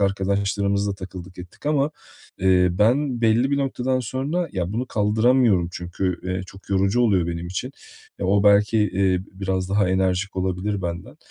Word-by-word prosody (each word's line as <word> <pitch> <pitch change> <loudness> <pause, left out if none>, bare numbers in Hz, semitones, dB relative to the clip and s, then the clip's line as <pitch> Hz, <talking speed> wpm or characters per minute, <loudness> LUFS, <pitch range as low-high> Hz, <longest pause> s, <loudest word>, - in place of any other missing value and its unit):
arkadaşlarımızla 100 +1 0
takıldık 95 -1 -10
ettik 90 +10 -11
ama, 150 0 +2 0.5
eee, 90 -1 +4
ben, 120 +7 +1
belli 115 +4 +3
bir 140 - +2
noktadan 130 -1 -1
sonra 140 +8 -2
ya 90 0 -2
bunu 125 +3 -2
kaldıramıyorum 110 -3 +2
çünkü, 90 0 -3
eee, 90 0 -2
çok 95 +1 -15
yorucu 95 +4 +2
oluyor 95 -8 +3
benim 85 0 -4
için. 105 +10 -4 0.5
E, - - -3
o 100 0 +3
belki, 105 +2 +4
eee, 95 -3 +1
biraz 95 -1 -2
daha 100 -1 +2
enerjik 95 +1 0
olabilir 95 +2 -2
benden. 85 0 -5
100 Hz, 155 wpm, -23 LUFS, 95-115 Hz, 0.5 s, eee